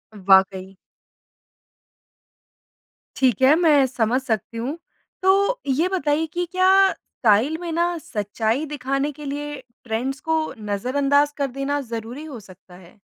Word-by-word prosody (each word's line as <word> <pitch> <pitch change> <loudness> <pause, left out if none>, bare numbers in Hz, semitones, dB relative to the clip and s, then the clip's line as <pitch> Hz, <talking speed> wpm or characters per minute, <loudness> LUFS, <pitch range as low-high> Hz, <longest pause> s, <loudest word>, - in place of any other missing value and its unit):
वाक़ई। 190 -1 +2 2.4
ठीक 255 -3 +1
है, 275 +4 +6
मैं 305 -5 +4
समझ 245 +1 0
सकती 230 -1 -3
हूँ। 270 +8 -3 0.4
तो 400 +6 +3
ये 300 +7 +1
बताइए 320 -4 0
कि 355 0 -1
क्या 380 +1 +5
स्टाइल 235 +8 +1
में 340 -1 -4
ना 340 +1 0
सच्चाई 220 +2 -2
दिखाने 275 0 -2
के 295 +1 -11
लिए 290 +1 -4 0.3
ट्रेंड्स 250 +4 -3
को 320 0 +2
नज़रअंदाज़ 275 +8 +1
कर 280 -1 0
देना 275 +2 -2
ज़रूरी 235 +3 -7
हो 270 -7 -8
सकता 185 -2 -16
है? 180 +2 -17
275 Hz, 130 wpm, -22 LUFS, 225-310 Hz, 2.4 s, है